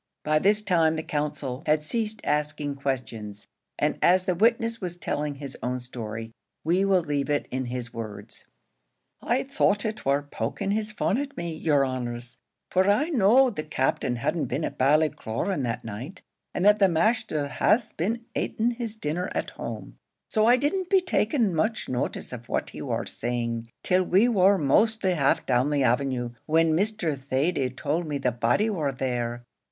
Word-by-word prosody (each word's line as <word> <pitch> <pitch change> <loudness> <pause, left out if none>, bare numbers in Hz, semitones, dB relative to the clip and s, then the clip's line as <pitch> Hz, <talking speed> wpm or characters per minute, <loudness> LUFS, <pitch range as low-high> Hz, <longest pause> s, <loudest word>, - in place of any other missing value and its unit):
By 155 0 +2
this 210 +4 +3
time 165 -5 +3
the 160 - -3
counsel 145 -4 -3
had 155 0 +3
ceased 220 +5 -2
asking 150 -1 -1
questions, 115 -7 -4 0.3
and - - 0
as 185 +1 +5
the 185 - +1
witness 230 +3 +2
was 175 -2 -4
telling 150 -4 -2
his 140 -1 -7
own 125 +2 -2
story, 115 -2 -6 0.3
we 175 +5 +2
will 195 -2 +3
leave 145 -3 -1
it 145 0 0
in 130 0 -2
his 120 -1 -5
words. 110 -3 -8 0.7
"I 245 +3 +1
thought 220 -6 +1
it 215 0 -3
war 140 +1 +2
poking 145 +6 -3
his 215 0 0
fun 220 +1 0
at 285 0 -5
me, 170 -1 -3
yer 150 -3 +2
honours 120 -2 -5 0.3
for 185 +2 +3
I 260 +11 +3
knowed 250 - +4
the 155 - -1
Captain 130 -4 0
hadn't 150 +6 -1
been 155 - -2
at - - -6
Ballycloran 150 - +1
that 115 -1 -3
night, 125 - -7 0.3
and 180 - -1
that 210 0 +6
the 195 -2 +5
masther 170 -3 +1
had 215 - +2
been 230 +8 -2
ating 230 +2 0
his 230 -2 -5
dinner 180 -1 -2
at - - -2
home, - - -7 0.3
so 215 -2 +3
I 245 +1 +6
didn't 355 +7 -1
be 385 -2 +5
taking 230 - +1
much 215 +8 0
notice 125 0 -2
of 120 -1 -9
what - - -1
he - - -8
war - - -2
saying, 115 -1 -3 0.2
till 185 0 +3
we 190 +5 +4
war 200 -4 +4
mostly 195 +6 +2
half 140 -5 +2
down 130 +2 +2
the 145 -2 +1
avenue, 125 -1 +1 0.2
when 160 0 +3
Mr. 195 -4 0
Thady 135 +1 0
told 155 +6 -2
me 145 -2 -2
the 130 -2 0
body 120 - +1
war 160 -10 -1
there. 120 -2 -3
155 Hz, 175 wpm, -26 LUFS, 130-210 Hz, 0.7 s, that